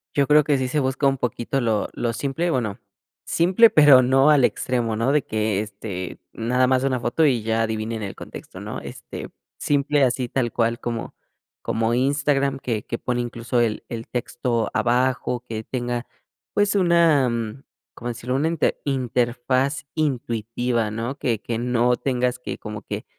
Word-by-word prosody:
Yo 140 -1 +3
creo 150 0 +6
que 145 -1 +2
sí 130 -1 -1
se 150 +4 0
busca 135 +1 +1
un 135 0 +1
poquito 125 +2 -2
lo 110 -3 0
lo 120 -1 -2
simple, 140 +8 -1
bueno, 120 -9 -1 0.5
simple 185 +7 +5
pero, 145 -7 +7
no 135 +3 +4
al 145 -4 +6
extremo, 120 -3 -1
¿no?, 115 +5 +1
de 145 -1 +2
que, 110 -2 -1
este, 100 -3 -6
nada 125 +3 +1
más 130 0 +2
una 130 -2 +1
foto 120 +7 +1
y 125 -6 +2
ya 115 +1 +1
adivinen 110 0 -3
el 100 - -5
contexto, - - -10
¿no? - - -5
Este, - - -8 0.3
simple, 145 0 +1
así 125 -1 +1
tal 120 -2 -1
cual 115 0 0
como 115 -1 -4 0.5
como 115 +1 0
Instagram, 140 +1 +1
que 115 -5 -2
que 120 - -3
pone 125 0 -2
incluso 120 0 -2
el 115 -3 0
el 115 -1 -6
texto 120 -2 -2
abajo, 125 0 +1
que 110 -1 -4
tenga, 120 0 -3 0.5
pues, 205 0 +2
una, 170 -8 +4
mm 115 +2 -4 0.3
¿cómo 120 - -6
decirlo?, 120 +2 -3
una 145 +4 +1
inte 165 -1 0
interfaz 130 +1 0
intuitiva, 120 -5 -1
¿no?, 115 +5 -3
que 115 -6 -1
que 115 - -3
no 125 +1 +2
tengas 125 -1 -1
que 125 - -5
como 105 -1 -7
que - - -5
125 Hz, 170 wpm, -23 LUFS, 115-135 Hz, 0.5 s, pero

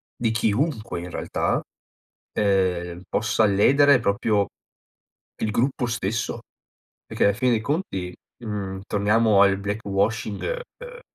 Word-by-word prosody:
di 120 - 0
chiunque 115 - -1
in 90 - -7
realtà, - - -1 0.7
ehm, 90 -3 0
possa 110 0 +1
ledere 135 +8 +5
proprio 100 -1 +1 1.0
il 110 - +1
gruppo 125 +3 0
stesso, 115 -2 -2 0.7
e - - -10
che - - +2
ala 100 - +4
fine 125 +4 +1
dei 115 - +2
conti, 115 - -2 0.3
mhmm, 100 -3 -4
torniamo 105 0 +3
al 100 -1 +4
black 105 +2 -4
washing, 100 +2 -1 0.4
ehm, - - -10
105 Hz, 125 wpm, -24 LUFS, 100-115 Hz, 1.0 s, ledere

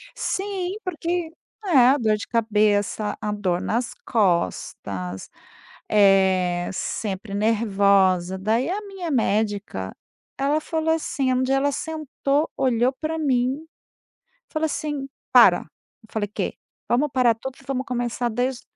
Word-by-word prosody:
Sim, 385 -1 -2
porque 345 -1 -2 0.3
é, - - -5 0.2
a 275 - +5
dor 215 -3 +2
de 210 - -7
cabeça, 210 -2 +1
a 210 - -2
dor 185 -4 -1
nas 235 +1 -1
costas, 100 - -1 0.6
eh, 190 -3 +3
sempre 195 +1 -4
nervosa. 200 -4 +2
Daí 220 +7 +1
a 400 - -1
minha 385 -5 -6
médica, 205 - -1 0.4
ela 285 +3 +1
falou 320 0 -1
assim 280 -5 -1
um 255 0 +1
dia 265 +1 +1
ela 285 +1 +1
sentou, 305 -1 -1
olhou 250 0 +2
pra 320 +1 -2
mim, 270 +1 0 0.8
falou 310 0 -1
assim: 295 -3 -3 0.2
"Para". - - +7 0.4
Eu 220 - -20
falei: 210 -2 -1
"Quê?". - - -2 0.3
"Vamos 280 +5 +2
parar 245 -3 +4
tudo 260 +3 -7
e - - -21
vamos 265 0 -2
começar 245 -1 -2
desde 245 +2 -1
240 Hz, 130 wpm, -23 LUFS, 205-290 Hz, 0.8 s, Para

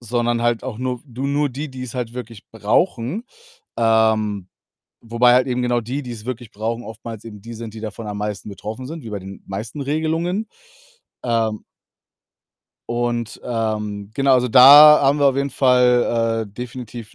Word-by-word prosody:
sondern 120 0 -1
halt 120 -1 +1
auch 130 -5 -5
nur, 125 -1 -3
du 130 +2 -5
nur 145 +1 +1
die, 145 +3 -6
die's 130 -2 -8
halt 120 -2 -4
wirklich 115 -4 -9
brauchen. 120 - 0 0.5
Ähm, 110 -4 +2 0.5
wobei 120 +2 +3
halt 125 +1 +3
eben 125 -1 -1
genau 120 -1 +1
die, 130 +6 -4
die's 115 -3 -8
wirklich 125 -3 -6
brauchen, 115 +3 -4
oftmals 110 -1 -9
eben 105 -3 -10
die 115 +2 -9
sind, 115 -1 -8
die 110 - -8
davon 110 +1 -7
am 105 0 -5
meisten 105 -1 -4
betroffen 110 +6 -7
sind, 160 -3 -8
wie 110 - -8
bei 100 - -4
den 95 +1 -11
meisten 110 +8 -6
Regelungen. 160 +8 -1 0.8
Ähm 115 -3 -1 1.3
und, 120 -2 -2
ähm, 105 -3 -3
genau, 135 0 +3
also 125 0 +2
da 145 +5 +9
haben 140 +2 +3
wir 145 - +4
auf 135 -1 +2
jeden 140 0 0
Fall, 120 -3 +2
äh, - - -27
definitiv 120 -1 -8
120 Hz, 170 wpm, -20 LUFS, 110-130 Hz, 1.3 s, da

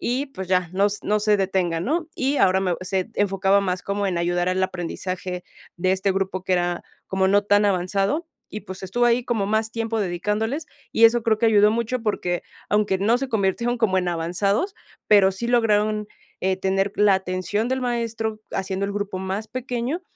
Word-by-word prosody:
y, 260 +4 -1
pues, 190 -9 -8
ya, 180 -2 +2
nos 200 +2 +1
no 210 +1 +2
se 210 0 +3
detengan, 185 -3 0
¿no?" 320 +5 -1
Y 275 +2 0
ahora 190 0 +4
me 180 -2 0
se 190 +2 -2
enfocaba 195 0 +2
más 180 -2 -2
como 200 +1 -1
en 180 -3 -1
ayudar 175 +1 0
al 185 +1 0
aprendizaje 185 0 -4 0.3
de 185 +2 +1
este 190 +1 +1
grupo, 190 -1 -2
que 190 - 0
era 175 0 -1 0.2
como 190 0 +1
no 205 +1 +4
tan 205 0 +4
avanzado 195 - 0 0.2
y, 210 - -5
pues, 185 0 -9
estuvo 240 +6 0
ahí 240 +1 +2
como 220 -5 0
más 220 +1 0
tiempo 225 -1 -2
dedicándoles, 210 - -2 0.3
y 230 - +4
eso 235 0 +1
creo 220 -2 +2
que 230 - +3
ayudó 210 -1 +5
mucho, 235 +1 -2
porque 180 -4 -1 0.3
aunque 205 -2 +2
no 225 +5 +2
se 270 0 -3
convirtieron 230 +3 0
como 190 -5 +2
en 180 - -1
avanzados, 195 - 0 0.3
pero 195 -2 +6
sí 235 +5 -4
lograron, 215 -3 +2 0.3
eh, 190 0 +1
tener 195 +1 0
la 205 -2 +5
atención 190 +4 -1
del 260 0 -1
maestro 230 -3 -2
haciendo 190 0 -2
el 200 - -4
grupo 205 -2 -3
más 190 +3 -4
pequeño 255 +6 -3
200 Hz, 190 wpm, -23 LUFS, 185-225 Hz, 0.3 s, pero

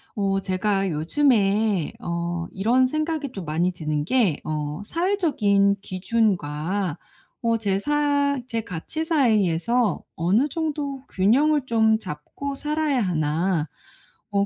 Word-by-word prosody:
어 195 -2 +1
제가 195 +1 0
요즘에 200 - +2
어 170 0 -3
이런 235 +7 +3
생각이 310 -1 -2
좀 190 -4 -6
많이 165 +4 0
드는 155 -4 -2
게 210 - +2
어 150 +2 -3
'사회적인 215 - +2
기준과 185 -4 -1 0.5
어 230 -1 +2
제 200 -3 0
사 285 +1 +1
제 230 -2 -2
가치 215 - -5
사이에서 230 - +2
어느 195 - +2
정도 290 -4 -3
균형을 275 +9 +3
좀 220 -2 +3
잡고 205 - -6
살아야 300 -1 0
하나? 165 -1 0 0.6
어 200 0 +2
205 Hz, 215 characters per minute, -24 LUFS, 175-275 Hz, 0.6 s, 이런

